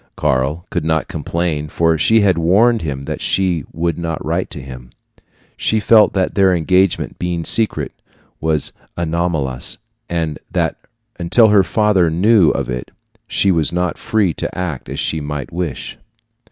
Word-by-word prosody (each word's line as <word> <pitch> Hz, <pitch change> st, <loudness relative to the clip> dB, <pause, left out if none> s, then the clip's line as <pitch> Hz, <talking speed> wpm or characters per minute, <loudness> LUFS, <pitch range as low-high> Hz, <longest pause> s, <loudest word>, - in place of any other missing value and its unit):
Karl 70 Hz, +7 st, 0 dB
could 85 Hz, -, -1 dB
not 80 Hz, 0 st, 0 dB
complain, 80 Hz, -3 st, -2 dB
for 80 Hz, +1 st, +2 dB
she 110 Hz, +8 st, +4 dB
had 100 Hz, -3 st, +3 dB
warned 105 Hz, +7 st, +3 dB
him 70 Hz, -3 st, -4 dB
that -, -, -5 dB
she 90 Hz, -6 st, 0 dB
would 85 Hz, 0 st, -2 dB
not 80 Hz, -2 st, -4 dB
write -, -, -1 dB
to -, -, -7 dB
him. 65 Hz, -2 st, -10 dB, 0.7 s
She 110 Hz, -, +1 dB
felt 110 Hz, 0 st, +5 dB
that 95 Hz, -2 st, 0 dB
their 95 Hz, -2 st, +3 dB
engagement, 90 Hz, +2 st, +1 dB
being 85 Hz, -2 st, -2 dB
secret, 110 Hz, -2 st, +1 dB, 0.5 s
was 80 Hz, -2 st, -1 dB, 0.3 s
anomalous, 80 Hz, -6 st, -2 dB, 0.3 s
and 80 Hz, -3 st, -2 dB
that -, -, 0 dB, 0.4 s
until 110 Hz, +6 st, +4 dB
her 100 Hz, -2 st, +5 dB
family 95 Hz, -2 st, +2 dB
knew 95 Hz, +1 st, +4 dB
of 70 Hz, -3 st, -1 dB
it 60 Hz, -1 st, -5 dB, 0.4 s
she 100 Hz, -, +2 dB
was 80 Hz, -4 st, +1 dB
not 90 Hz, -1 st, -1 dB
free 110 Hz, -6 st, 0 dB
to -, -, -5 dB
act 80 Hz, -8 st, -4 dB
as -, -, -5 dB
she 80 Hz, -, -1 dB
might 75 Hz, -1 st, -5 dB
wish. 85 Hz, -7 st, -4 dB
85 Hz, 155 wpm, -18 LUFS, 75-95 Hz, 0.7 s, felt